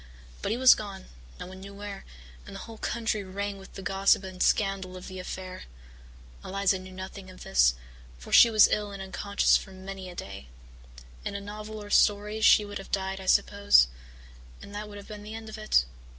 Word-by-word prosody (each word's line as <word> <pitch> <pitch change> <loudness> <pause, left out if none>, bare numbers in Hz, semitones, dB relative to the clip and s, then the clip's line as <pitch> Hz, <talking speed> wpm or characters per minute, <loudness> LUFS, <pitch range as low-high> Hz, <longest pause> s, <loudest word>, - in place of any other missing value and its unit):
But - - -2
he 225 - 0
was 260 0 +8
gone, 200 -3 -7 0.3
no - - -6
one 185 +1 -10
knew 200 +1 -10
where, 200 -1 -8 0.4
and 200 - -9
the 195 - -7
whole 225 -1 -10
country 225 -3 -1
rang 200 +1 -4
with 190 - -14
the 195 - -8
gossip 195 +1 +3
and 185 -1 -8
scandal 195 -3 +1
of 180 - -10
the 185 -1 -7
affair. 185 0 -7 0.8
Eliza 195 0 0
knew 185 0 -11
nothing 190 +1 -8
of 185 - -12
this, - - +4 0.4
for 60 - -10
she 235 - +9
was 215 -2 +7
ill 210 -1 0
and 200 -1 -8
unconscious 200 +1 +2
for 195 - -10
many 190 0 -8
a 175 - -10
day. 100 - -8 0.8
In - - -4
a - - -2
novel 210 +1 -8
or 205 - -10
story 210 +1 +3
she 210 -1 +6
would 205 0 -6
have 195 - -10
died, 190 0 -2
I 190 - -9
suppose, 200 - +5 0.7
and 200 - -12
that 210 +1 -6
would 205 - -9
have 200 - -11
been 210 -1 -8
the 210 +1 -8
end 225 -1 -8
of 220 - -8
it. 215 - +3
200 Hz, 210 wpm, -28 LUFS, 190-210 Hz, 0.8 s, she